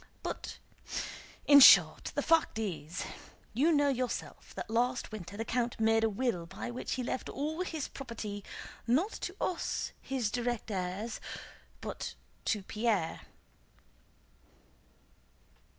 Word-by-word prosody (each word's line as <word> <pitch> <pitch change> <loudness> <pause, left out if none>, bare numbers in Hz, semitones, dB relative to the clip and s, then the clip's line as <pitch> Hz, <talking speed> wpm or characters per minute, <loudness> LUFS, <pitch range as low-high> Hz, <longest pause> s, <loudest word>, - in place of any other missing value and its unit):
"But... - - -4 0.9
in 285 -1 +9
short, 270 - +9
the - - +1
fact 325 -8 +3
is... 180 -5 -3 0.5
you 285 +9 +4
know 290 -2 +4
yourself 255 -2 -3
that - - -4
last 245 +2 +1
winter 205 -2 -7
the 225 - -2
count 240 0 -1
made 225 0 +4
a 225 - +4
will 200 -6 -1
by 240 - -5
which 245 - -3
he 255 - -2
left 255 - -3
all 310 +5 -2
his 320 -5 -2
property, 220 -6 -6 0.4
not 310 - +3
to 365 - -5
us 360 - -1
his 250 -6 -1
direct 240 -2 -2
heirs, 190 +4 -3 0.6
but - - -5 0.3
to 210 -3 +1
Pierre." 210 -5 0
235 Hz, 125 wpm, -32 LUFS, 210-270 Hz, 0.9 s, in